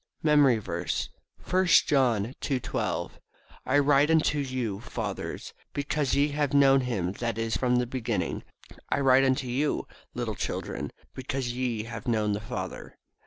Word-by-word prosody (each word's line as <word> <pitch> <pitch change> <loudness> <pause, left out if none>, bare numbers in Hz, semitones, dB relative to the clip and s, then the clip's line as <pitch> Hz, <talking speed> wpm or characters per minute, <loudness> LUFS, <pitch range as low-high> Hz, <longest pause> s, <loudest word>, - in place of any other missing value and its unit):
MEMORY 145 -6 +5
VERSE, 90 -4 -3 0.4
I 185 +1 +4
John 125 - +3
2: 135 -3 0
12 - - -3 0.5
"I 130 +3 +3
write 145 +1 +4
unto 155 -2 +3
you, 130 -7 -2
fathers, 120 - -5 0.2
because 145 -1 0
ye 145 +1 +3
have 145 -1 -1
known 135 -1 +6
him 105 -8 -1
that 115 +2 -3
is 115 0 -1
from 125 -1 +1
the 125 0 +2
beginning. 125 -1 -2 0.5
I - - +1
write 135 -1 +5
unto 130 0 +1
you, 135 +5 -1 0.3
little - - -2
children, - - -4 0.2
because 130 -1 -3
ye 120 -3 -2
have 115 -1 -8
known 110 -3 +1
the 100 - -2
Father." 105 -4 -6
130 Hz, 150 wpm, -27 LUFS, 115-140 Hz, 0.5 s, known